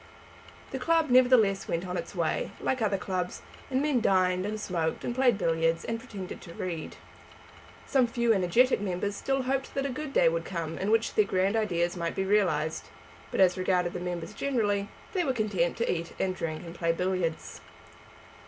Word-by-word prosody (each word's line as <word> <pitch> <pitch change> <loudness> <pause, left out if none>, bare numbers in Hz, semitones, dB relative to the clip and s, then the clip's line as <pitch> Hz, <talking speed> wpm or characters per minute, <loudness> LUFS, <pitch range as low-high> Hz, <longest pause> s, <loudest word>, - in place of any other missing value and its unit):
The - - -3
club, 330 -4 +2
nevertheless, 245 -6 +5
went 170 +2 -2
on 180 0 -4
its - - -5
way, - - 0
like 260 -2 -1
other 205 -3 +1
clubs, 185 -1 -3 0.3
and 265 +1 +1
men 290 -5 +2
dined 185 -1 +2
and 215 +1 -3
smoked 170 -5 -2
and 240 - -1
played 245 -3 +3
billiards 165 -2 +1
and 230 0 -2
pretended 195 -5 -8
to 170 -2 -11
read. 170 -4 -5 0.9
Some 260 -3 +3
few 235 -1 +2
energetic 200 +6 +3
members 200 +1 -2
still 270 +4 -1
hoped 270 +1 -2
that 275 0 0
a - - -1
good 275 +2 -5
day 275 - +4
would 165 0 +1
come 165 -2 -4
in 195 - -1
which 225 +1 +2
their 215 - +4
grand 195 +2 +1
ideas 175 -6 0
might 170 -1 -3
be 190 - -1
realised, 175 -6 +1 0.4
but - - -3
as 185 -1 +4
regarded 180 -1 +1
the - - -4
members 175 -2 -4
generally, 205 -7 0 0.2
they 370 -3 +1
were 270 -5 0
content 200 -7 0
to 235 - 0
eat 170 -1 -5
and 185 -1 0
drink 160 -1 -4
and 165 - -8
play 170 -1 0
billiards. 180 -1 -2
195 Hz, 190 wpm, -28 LUFS, 175-235 Hz, 0.9 s, nevertheless